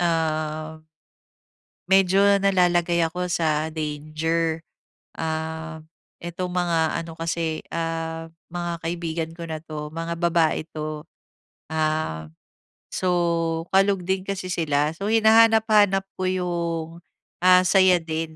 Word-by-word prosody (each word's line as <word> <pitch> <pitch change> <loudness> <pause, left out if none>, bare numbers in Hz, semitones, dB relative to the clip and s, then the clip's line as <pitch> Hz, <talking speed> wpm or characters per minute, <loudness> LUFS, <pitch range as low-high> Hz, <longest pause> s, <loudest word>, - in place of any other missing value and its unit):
ah, 155 -2 -1 1.1
medyo 195 0 +5 0.2
nalalagay 175 -3 +3
ako 180 +2 -3
sa 160 -2 0
danger. 160 +2 -2 0.6
Ah, 160 0 -4 0.4
itong 175 +1 -4
mga 175 -2 +1 0.3
ano 165 - -9
kasi, 165 -1 -2
ah, 165 0 -3 0.2
mga 175 -1 -3
kaibigan 165 -1 -3
ko 170 - -8
na 160 -1 -4
'to, 150 -1 -6
mga 165 0 -3
babae 170 -2 +2
'to. 155 0 -5 0.7
Ah, 155 - -1 0.6
so 185 -1 0 0.6
kalog 195 -1 +3
din 190 0 0
kasi 185 -2 -4
sila, 150 -3 +1
so 200 +4 -4
hinahanap-hanap 220 -3 +5 0.2
ko 185 - -1
'yong, 170 -3 -2 0.6
ah, 185 0 +7
saya 185 -1 +5
din 160 0 -4
165 Hz, 110 wpm, -24 LUFS, 160-180 Hz, 1.1 s, ah